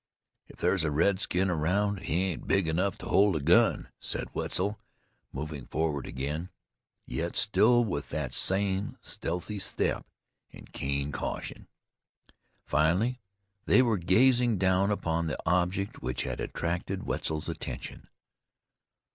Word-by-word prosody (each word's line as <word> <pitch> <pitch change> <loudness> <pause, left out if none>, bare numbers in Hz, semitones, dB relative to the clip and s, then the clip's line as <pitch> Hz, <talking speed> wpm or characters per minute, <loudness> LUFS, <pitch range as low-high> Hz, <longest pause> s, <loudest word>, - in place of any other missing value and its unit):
"If - - -14
there's 95 -4 +2
a 80 - +1
redskin 95 +3 +1
around 95 +5 +1
he 90 -2 0
ain't 95 -3 -3
big 95 -4 +2
enough 90 +4 0
to - - -9
hold 100 -2 +4
a - - +1
gun," 70 - +4
said - - -4
Wetzel, 100 +3 -1 0.5
moving 75 -1 -5
forward 75 0 -2
again, 75 +7 -3 0.6
yet 85 +1 -3
still 120 +3 +4
with 75 -9 -3
that 75 -5 -3
same 95 +1 0
stealthy 90 +5 -4
step - - -1 0.4
and - - -14
keen 70 +1 -2
caution. - - -5 1.0
Finally 100 +11 +2 0.4
they 130 - +6
were 115 -5 +1
gazing 120 +5 +4
down 95 +1 +3
upon 85 -5 0
the 75 - -2
object 90 +3 0
which - - -2
had - - -4
attracted 90 +3 -2
Wetzel's 80 -1 -2
attention. - - -6
90 Hz, 130 wpm, -29 LUFS, 80-100 Hz, 1.0 s, they